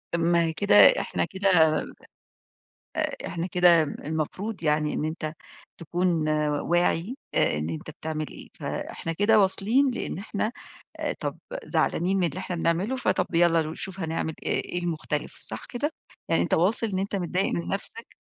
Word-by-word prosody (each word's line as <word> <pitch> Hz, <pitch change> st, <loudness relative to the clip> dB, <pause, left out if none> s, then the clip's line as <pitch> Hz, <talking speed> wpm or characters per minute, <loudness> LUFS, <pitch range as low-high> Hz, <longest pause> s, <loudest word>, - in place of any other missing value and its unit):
ما 170 Hz, -1 st, +2 dB
كده 105 Hz, -9 st, +2 dB, 0.2 s
إحنا 85 Hz, -1 st, -1 dB
كده 195 Hz, +1 st, 0 dB, 1.5 s
آآ -, -, -1 dB
إحنا 170 Hz, 0 st, -3 dB
كده 175 Hz, -2 st, +5 dB
المفروض 160 Hz, +8 st, -4 dB
يعني 150 Hz, 0 st, +1 dB
إن -, -, -2 dB
أنت 155 Hz, -1 st, -3 dB, 0.5 s
تكون 170 Hz, -1 st, 0 dB, 0.3 s
واعي 175 Hz, +6 st, 0 dB, 0.2 s
آآ -, -, +2 dB
إن 80 Hz, +2 st, -3 dB
أنت 80 Hz, -, -6 dB
بتعمل 155 Hz, 0 st, -4 dB
إيه، -, -, -11 dB
فإحنا 165 Hz, -, -4 dB
كده 205 Hz, +5 st, +4 dB
واصلين 225 Hz, +8 st, +3 dB
لإن 240 Hz, -, -4 dB
إحنا 215 Hz, +2 st, -3 dB, 0.7 s
طب -, -, -3 dB, 0.3 s
زعلانين 190 Hz, +3 st, +1 dB
من 175 Hz, -, +2 dB
اللي 165 Hz, +4 st, -4 dB
إحنا 180 Hz, -2 st, -4 dB
بنعمله، 175 Hz, +10 st, 0 dB
فطب 255 Hz, -, 0 dB
يالّا 170 Hz, -1 st, +4 dB
نشوف 180 Hz, +5 st, -5 dB
هنعمل 160 Hz, -1 st, -2 dB
إيه، -, -, 0 dB
إيه 180 Hz, -, 0 dB
المختلف، 165 Hz, -3 st, -3 dB
صح -, -, -4 dB
كده؟ 285 Hz, +5 st, -3 dB, 0.4 s
يعني 165 Hz, -, +2 dB
أنت -, -, +1 dB
واصل 200 Hz, +7 st, +3 dB
إن 190 Hz, -3 st, -2 dB
أنت 200 Hz, +1 st, -2 dB
متضايق 185 Hz, +1 st, 0 dB
من 170 Hz, -, -3 dB
نفسك. 440 Hz, -, -1 dB
175 Hz, 150 wpm, -26 LUFS, 160-195 Hz, 1.5 s, كده